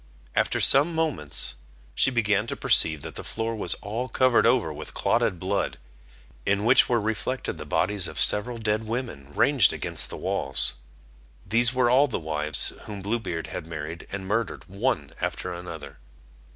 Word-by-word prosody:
After - - +1
some 150 +5 +4
moments 150 - -1 0.4
she - - +3
began 110 -3 0
to - - -4
perceive 80 -3 +3
that - - -7
the - - -6
floor 115 0 -3
was 110 - +3
all 115 +5 -4
covered 130 -1 +3
over 115 -10 +1
with - - -9
clotted 90 - +1
blood, 95 +3 -2 0.7
in 100 - 0
which 125 +3 +5
were 120 -1 +2
reflected 110 +4 -3
the - - -8
bodies 95 -2 +2
of - - -7
several 115 +4 +4
dead 110 0 -2
women 110 - -5
ranged - - +4
against - - -2
the - - -6
walls: 65 -1 0 0.7
these 115 +5 +3
were 125 -1 +1
all 135 +3 +4
the 125 - -3
wives 75 -3 +3
whom 100 -2 -8
Blue 115 +4 -1
Beard 80 -7 -5
had 80 - -7
married 80 +1 -7
and 95 -1 -5
murdered 115 +2 -2
one 95 - -2
after 90 - -3
another. 80 -5 -9
105 Hz, 165 wpm, -25 LUFS, 85-120 Hz, 0.7 s, which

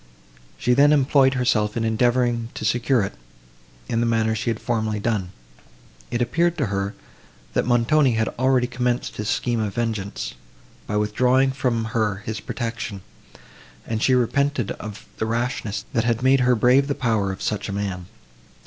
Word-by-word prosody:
She 125 - +2
then 140 +3 +5
employed 135 -1 +4
herself 115 -4 +1
in 115 - 0
endeavouring 120 +1 +1
to - - -4
secure 120 -1 +2
it, 100 - -4 0.7
in 115 - 0
the 120 - +1
manner 110 -1 +1
she 110 +1 -2
had 115 -1 -2
formerly 110 -3 -1
done. 100 -4 -1 0.8
It 120 0 0
appeared 170 +8 +1
to 145 - +1
her, 100 +1 -2 0.6
that - - 0
Montoni 125 +3 +3
had 110 0 +1
already 130 -1 +3
commenced 125 0 -2
his 105 0 -3
scheme 120 +2 0
of 105 -3 -2
vengeance, 110 -4 -3 0.5
by 105 - -1
withdrawing 125 +5 +2
from 125 -4 -1
her 105 -3 0
his 110 0 -3
protection, 115 -4 -5 0.8
and 110 -1 -3
she 130 - +4
repented 130 -1 +1
of 110 0 -8
the 110 - -1
rashness, 115 -2 -2
that 115 - +2
had 115 0 0
made 135 +1 +5
her 125 0 +3
brave 125 +5 +4
the 140 - -1
power 110 -6 0
of 95 - -7
such 105 -1 -2
a - - -2
man. 95 -3 -3
115 Hz, 165 wpm, -23 LUFS, 110-125 Hz, 0.8 s, then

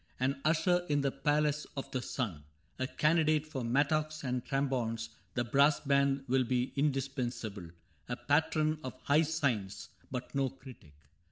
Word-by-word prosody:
An 135 +2 0
usher 175 +3 +3
in 145 -1 +2
the 140 -1 +1
Palace 150 +2 +1
of 135 - -5
the 130 - -1
Sun, 100 - -3 0.4
A 130 - 0
candidate 155 0 +2
for 145 -5 -5
mattocks 155 +5 +1
and 125 -2 -1
trombones 125 -5 -1 0.3
(The 120 - +1
brass 140 +5 +4
band 140 -1 +2
will 130 +1 +3
be 125 +1 -1
indispensable), 130 - -2 0.4
A 120 - -1
patron 155 +2 +1
of 130 -2 -6
high 145 +2 +4
science, 140 -11 -1 0.2
but 125 -1 -5
no 135 -1 +1
critic. 125 - -14
135 Hz, 150 wpm, -32 LUFS, 125-150 Hz, 0.4 s, brass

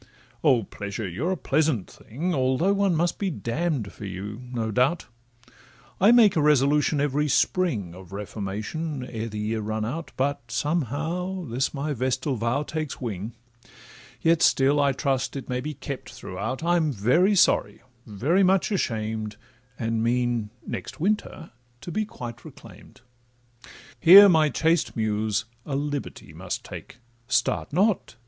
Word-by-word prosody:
O 130 -7 +4
Pleasure! 100 +2 -6
you 100 - -3
are 190 - +1
indeed - - -7
a - - -35
pleasant 145 - +1
thing, 160 +11 -4
Although 130 +7 +2
one 200 -3 +2
must 170 +2 0
be 200 - 0
damn'd 135 - -2
for 105 - -9
you, 100 +4 -6
no 115 -3 -2
doubt: 130 +10 +1 0.9
I 200 +5 +6
make 230 -5 +6
a 160 - +3
resolution 150 +1 +3
every 145 +1 +1
spring 130 - +1
Of 90 -1 -13
reformation, 105 +9 -4
ere 115 -2 -5
the 105 - -7
year 110 +1 -2
run 110 +1 -2
out, 155 +8 -5
But 135 -3 -1
somehow, 165 +6 -2
this 130 +1 -1
my 145 +2 -2
vestal 130 +2 -1
vow 120 +5 0
takes 155 -1 -4
wing, 110 -2 -5 0.9
Yet 165 0 +3
still, 140 +2 +4
I 140 -1 +3
trust 135 0 -1
it 135 - -6
may 125 0 -2
be 150 +2 -5
kept 135 0 -7
throughout: 110 +10 -5
I'm 170 -3 +2
very 140 - +3
sorry, 175 - +2 0.2
very 130 - +1
much 190 +2 +3
ashamed, 110 - -2 0.4
And 115 -1 -1
mean, 120 -2 0 0.2
next - - -6
winter, 185 -2 -2 0.3
to 175 - -7
be 215 +6 -1
quite 120 - -8
reclaim'd. - - -14 1.0
Here 195 +4 +10
my 160 -5 +4
chaste 165 +2 +1
Muse 110 -1 0 0.2
a 140 - -4
liberty 145 0 -4
must - - -5
take— - - -9 0.3
Start 130 - 0
not! 190 - +1
135 Hz, 150 wpm, -25 LUFS, 110-165 Hz, 1.0 s, Here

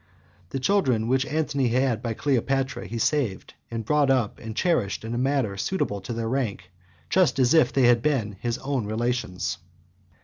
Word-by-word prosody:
The 135 - -3
children 130 - +2
which 130 +2 +1
Antony 145 -4 0
had 125 -1 +1
by 115 -3 -3
Cleopatra 135 +1 0
he 115 - -5
saved, 115 -5 -1 0.2
and 115 -1 -4
brought 150 +2 +2
up 125 -6 +1
and 110 -1 -7
cherished 125 - 0
in 115 - -4
a - - -2
manner 130 -6 0
suitable 100 - -2
to 95 - -7
their 115 -1 -2
rank, 115 -8 -2 0.4
just 185 - +3
as 130 0 +4
if 155 -6 +5
they 135 - +2
had 120 -1 +5
been 115 -8 0
his 120 +1 -2
own 135 -5 -2
relations. 110 -5 -2
125 Hz, 175 wpm, -25 LUFS, 115-140 Hz, 0.4 s, if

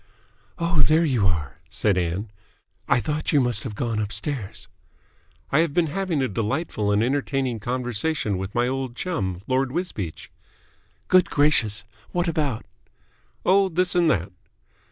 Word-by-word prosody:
"Oh, 170 -2 +2
there 155 +4 +4
you 120 -10 +2
are," 80 -5 -2
said 105 -3 +1
Ann. 90 +4 -1 0.6
"I - - +4
thought 150 +4 -2
you 145 - +5
must 120 -4 +1
have 110 -5 -5
gone 115 -2 -1
upstairs." 110 +1 -4 0.8
"I 140 - +4
have 165 -3 +1
been 175 - +4
having 185 -7 0
a - - +1
delightful 110 - -1
and 105 +2 +3
entertaining 135 -2 0
conversation 120 -1 -1
with 95 +1 -5
my 120 0 +2
old 130 -1 -3
chum, 95 - -2
Lord 130 0 +1
Wisbeach." 100 - -4 0.8
"Good 185 -1 +5
gracious! 115 -8 +3 0.3
What 175 0 +1
about?" 150 -8 -1 0.8
"Oh, 195 +1 +5
this 180 +1 +1
and 175 -2 +4
that." 95 - 0
130 Hz, 145 wpm, -24 LUFS, 105-160 Hz, 0.8 s, you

